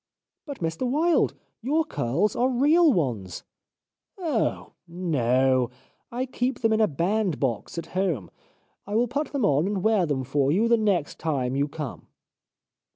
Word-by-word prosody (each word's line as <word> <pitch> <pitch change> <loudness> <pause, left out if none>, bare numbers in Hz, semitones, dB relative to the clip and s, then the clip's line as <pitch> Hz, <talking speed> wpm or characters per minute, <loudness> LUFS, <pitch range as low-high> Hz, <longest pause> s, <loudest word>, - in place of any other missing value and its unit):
" - - -64
But, 285 -7 -7
Mr 165 +10 -2
Wilde, 320 +6 +2 0.3
your 305 +7 +1
curls 170 - 0
are 250 +2 +2
real 295 +6 +4
ones! 115 - -2 0.3
" - - -65
" - - -58
Oh! 315 - -1 0.2
No! 130 -7 +1 0.4
I 250 +2 -2
keep 255 0 -2
them 225 -1 +3
in 220 - +2
a 215 - +5
bandbox 170 - -1
at 170 - -3
home. 175 - -1 0.6
I 205 - -3
will 240 +2 +3
put 285 +5 -3
them 275 -7 0
on 150 +5 +2
and 200 -2 -2
wear 215 -6 +3
them 135 -3 -1
for 140 +1 +1
you 210 +8 +2
the 235 - +5
next 200 -9 0
time 135 -5 -1
you 140 +1 +1
come." 145 -2 -7
185 Hz, 165 wpm, -25 LUFS, -, 0.6 s, a